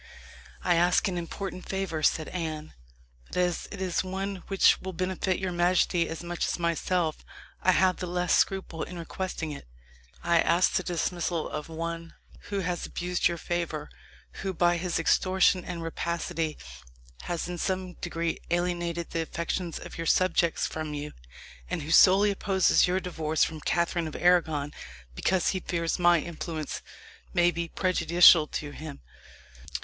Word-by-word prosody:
"I 175 -2 +3
ask 175 +4 +3
an 190 - -2
important 185 +2 -5
favour," 190 -5 -2
said 155 +1 +2
Anne, 155 -3 -4 0.5
"but - - -7
as 180 -1 0
it 200 - -8
is 185 -2 0
one 195 +1 -3
which 195 -1 +4
will 190 0 -5
benefit 185 +1 -1
your 190 -1 -2
majesty 175 -1 +2
as 165 +1 -6
much 175 0 -2
as - - -1
myself, 170 -1 0 0.4
I 185 - +4
have 185 0 +3
the 180 - -4
less 180 +1 0
scruple 190 -4 +1
in 180 - -5
requesting 170 -1 -4
it. 140 - -9 0.6
I 170 -1 +3
ask 170 +3 +3
the - - +2
dismissal 175 -1 -1
of 150 +1 -6
one 165 +1 -5 0.3
who 200 -1 -1
has 180 -1 -2
abused 180 0 0
your 170 - -3
favour, 165 -3 -3 0.5
who, 190 -1 -3
by 175 +1 +3
his 175 0 -1
extortion 185 +2 +3
and 170 -2 -5
rapacity, 165 -1 -2 0.7
has 175 -1 -2
in 175 -1 -5
some 185 0 -2
degree 170 -1 -2
alienated 175 -1 -1
the 165 - -1
affections 170 +1 -3
of - - -9
your 165 - -2
subjects 175 -2 +2
from 155 -1 -4
you, 150 +1 -5 0.6
and - - -2
who 155 - -5
solely 195 +4 +7
opposes 190 -2 +3
your 180 +1 +1
divorce 160 -4 0
from 160 -1 -2
Catherine 170 0 0
of 155 - -7
Arragon 160 -5 +2 0.4
because 180 - +1
he 190 - -1
fears 170 -1 -2
my 175 -1 +5
influence 160 -1 -5 0.5
may 175 0 +5
be 170 0 -3
prejudicial 170 -2 +5
to 150 -1 -5
him." 150 -1 -8
175 Hz, 155 wpm, -28 LUFS, 165-185 Hz, 0.7 s, solely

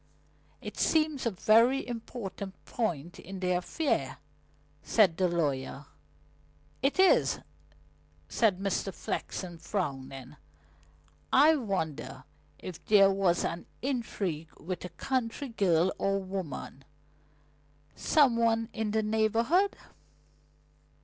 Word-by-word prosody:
"It - - -7
seems 310 -5 +2
a - - +3
very 230 +6 +3
important 215 -5 -6
point 175 - -3
in 190 +2 -8
the 180 -1 0
affair," 180 - -1 0.6
said 195 -7 +3
the 185 +1 +2
lawyer. 145 -5 -2 1.0
"It 275 +5 +1
is," 345 - +5 0.9
said 215 -5 +2
Mr. 195 0 -1
Flexen, 175 -2 -5
frowning. 135 -6 -4 0.9
"I 305 +4 +6
wonder 195 - -3 0.3
if 175 -2 -9
there 195 -2 +6
was 190 -3 +1
an 170 +1 -4 0.2
intrigue 200 - -2
with 180 +1 -5
a 180 - -5
country 255 - -2
girl 185 -5 +2
or 195 0 +1
woman, 185 -8 -6 1.1
some 275 -7 +3
one 225 -1 +2
in 220 -2 -2
the 220 +1 +1
neighbourhood?" 230 - +2
195 Hz, 105 wpm, -30 LUFS, 175-230 Hz, 1.1 s, I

